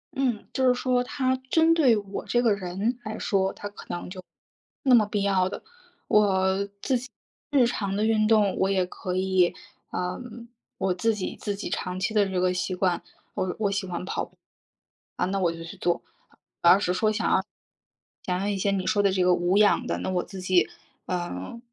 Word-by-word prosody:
嗯， 250 -6 -1
就 260 -1 +2
是 250 - +5
说 250 0 +1
它 260 0 0
针 325 +2 +5
对 270 -9 +4
我 200 -1 -5
这 240 - +2
个 225 -3 +4
人 200 +5 -2
来 220 0 -5
说， 190 -1 +1
它 205 - -7
可 205 - -12
能 175 - -5
就 185 +1 -8
没 - - -42 0.6
那 260 -2 +6
么 220 -3 +5
必 205 -1 -1
要 190 -2 +2
的， - - -7 0.4
我 195 -1 +3
自 260 -3 +1
己 250 +1 -10 0.4
日 275 -4 +4
常 200 -4 -2
的 210 +2 +1
运 215 -1 +3
动 215 -3 +3
我 190 - +2
也 190 -2 +2
可 180 0 -5
以 185 -1 +2 0.4
嗯， 230 +6 -5 0.3
我 190 -1 +1
自 220 +5 +1
己 195 - -4
自 205 -2 -3
己 200 - -5
长 180 -1 -3
期 200 +3 -1
的 205 -2 +3
这 190 -1 -1
个 180 0 +2
习 180 +1 -2
惯， 180 -2 +1 0.3
我 185 -1 -2
我 205 -2 +1
喜 200 -1 -2
欢 180 0 -4
跑 - - -2
步， - - -13 0.8
啊 - - 0
那 195 +2 -1
我 175 -3 +2
就 165 0 -8
去 165 - -9
做， 175 0 0 0.6
我 170 - +6
要 180 - +8
是 180 -3 0
说 215 +3 +2
想 215 0 0
要 190 - +4 0.8
想 180 0 -1
要 195 - -1
一 205 - 0
些 195 +1 0
你 190 -2 -1
说 205 +2 +2
的 200 -1 +3
这 185 -1 +1
个 180 0 +5
无 175 +2 +2
氧 210 0 +4
的， - - -1
那 - - -3
我 180 -1 +1
自 190 -2 -9
己， 185 -1 +3 0.4
呃， 175 - -4
195 Hz, 230 characters per minute, -26 LUFS, 185-220 Hz, 0.8 s, 要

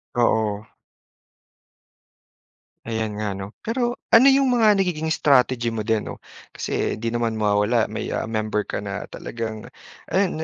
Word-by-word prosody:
Oo. 110 -3 +1 2.2
Ayan 110 -2 -3
nga, 105 -2 -2
'no. 95 +2 -8
Pero 240 +1 -1 0.2
ano, 230 +3 +8
‘yong 275 0 +4
mga 220 -4 +4
nagiging 170 -5 0
strategy 130 -6 +2
mo 110 - -2
din, 110 0 0
‘no, - - -8 0.3
kasi - - -2
di 115 - -1
naman 115 -1 -1
mawawala 105 +2 +1
may, - - -4
ah, - - -3
member 110 -1 -1
ka - - -2
na 100 -1 -4
talagang, 110 -2 -6 0.5
ayan 185 -4 +1
115 Hz, 140 wpm, -23 LUFS, 110-160 Hz, 2.2 s, ano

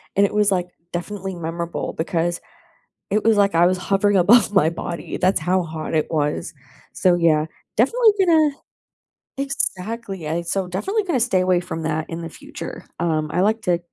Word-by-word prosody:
and 200 +1 +5
it - - -3
was, 210 -1 +3
like, 180 -1 0 0.3
definitely 190 +1 -4
memorable 170 0 -4
because 170 0 -1 0.7
it 210 +2 +1
was 220 -2 +4
like 200 -2 +3
I 170 +1 +5
was 185 0 +1
hovering 200 +2 +1
above 205 +3 +5
my 165 -5 +4
body, 170 0 -5
that's 185 0 +2
how 180 +2 +1
hot 160 0 -6
it 155 - +1
was. 150 -1 -1 0.4
So, 180 -2 +3
yeah, 160 -3 +3 0.3
definitely 445 - +4
gonna 320 -5 +4 0.9
Exactly, 215 - -3
I 170 +2 -1
so 185 +2 -2
definitely 395 - -1
gonna 310 -10 0
stay 225 -6 +2
away 185 -1 +2
from 165 -2 -5
that 155 0 -1
in 165 +1 -5
the 165 - -5
future. - - -9 0.2
Um, 155 -3 0
I 180 - +1
like 220 +2 +1
to, 175 -1 +1
185 Hz, 175 wpm, -21 LUFS, 170-210 Hz, 0.9 s, and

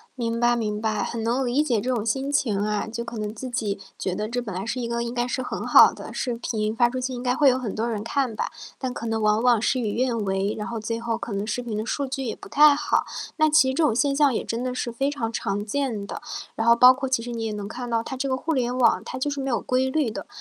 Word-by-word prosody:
明 230 -2 -2
白 240 0 +3
明 215 -3 -2
白， 215 -1 -1
很 230 +2 -3
能 250 +3 +1
理 250 +5 +2
解 245 -8 +1
这 245 - -4
种 235 -4 0
心 265 +5 -1
情 265 -8 +1
啊。 210 0 -1
就 230 +1 -4
可 235 0 -7
能 210 0 -4
自 255 +3 -6
己 210 -5 -2 0.2
觉 185 - -2
得 210 +2 -3
这 245 +2 -2
本 210 -5 -6
来 190 +3 -4
是 240 - -2
一 240 - -2
个 235 0 -1
应 235 0 -4
该 240 0 0
是 250 +1 -2
很 - - -4
好 - - +8
的 - - -9
视 245 -2 -2
频， 220 -2 -2
发 240 -1 +4
出 255 - -3
去 255 0 -3
应 245 - -5
该 250 0 +1
会 285 +1 +5
有 255 0 +3
很 230 -6 -4
多 225 +2 -1
人 215 -2 -3
看 250 -2 -1
吧。 - - -2 0.3
但 260 -2 -3
可 230 - -6
能 225 -1 -1
往 215 +1 +3
往 245 -3 +4
事 255 +3 +1
与 215 -3 -1
愿 250 +1 0
违， 195 +2 0
然 210 - -4
后 235 - -4
最 230 +1 -3
后 230 -1 -1
可 230 -1 -6
能 200 +1 -2
视 230 +3 -2
频 225 -3 -4
的 215 - -3
数 280 +5 -1
据 270 0 -4
也 230 - -3
不 - - -13
太 295 0 +6
好。 295 +1 0 0.3
那 310 -1 +4
其 300 -3 +5
实 - - -1
这 325 - 0
种 270 -8 +3
现 280 +2 +2
象 280 -2 +3
也 - - -2
真 230 +1 -3
的 255 0 -2
是 240 -1 -3
非 270 +4 0
常 230 -6 -3
常 205 -2 -2
见 225 -3 -2
的， - - -6 0.4
然 225 +1 0
后 235 - +7
包 250 +2 +9
括 265 +1 -3
其 255 -3 +1
实 240 - -6
你 230 -1 -3
也 220 - -2
能 205 -1 -5
看 245 +4 -6
到 230 -1 0
它 245 - -6
这 270 +1 -2
个 260 - +1
互 320 +5 -2
联 250 -3 0
网 240 -3 +3
它 - - -5
就 290 +3 -1
是 280 -1 -3
没 270 - -3
有 235 - 0
规 260 0 +1
律 270 -3 0
的。 - - -6
240 Hz, 325 characters per minute, -24 LUFS, 220-260 Hz, 0.4 s, 包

